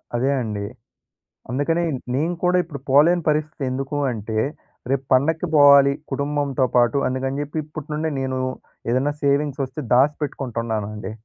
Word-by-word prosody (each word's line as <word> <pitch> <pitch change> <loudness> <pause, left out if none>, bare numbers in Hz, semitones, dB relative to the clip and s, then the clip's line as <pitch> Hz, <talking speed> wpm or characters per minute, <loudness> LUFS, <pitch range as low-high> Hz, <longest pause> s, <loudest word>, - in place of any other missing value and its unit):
అదే 130 +4 +1
అండి. 105 -3 -3 0.9
అందుకనే 145 +7 0 0.3
నేను 160 +6 0
కూడా 180 0 +3
ఇప్పుడు 150 -5 -8
పోలేని 165 +6 +5
పరస్థితి 155 0 0
ఎందుకు 135 +2 -3
అంటే, 110 -1 -4 0.5
రేపు 135 0 0
పండక్కి 160 +6 +2
బోవాలి, 140 -1 +7 0.2
కుటుంబంతో 140 -1 0
పాటు 120 +2 +4
అందుకని 130 +2 -2
జెప్పి, 145 +2 -5
ఇప్పటినుండే 155 +1 -4
నేను 130 -1 -2 0.5
ఏదైనా 135 +4 +1
సేవింగ్స్ 140 0 +1
ఒస్తే 150 +3 -7
దాసిపెట్టుకుంటున్నానండి. 115 -7 -1
140 Hz, 125 wpm, -22 LUFS, 130-150 Hz, 0.9 s, బోవాలి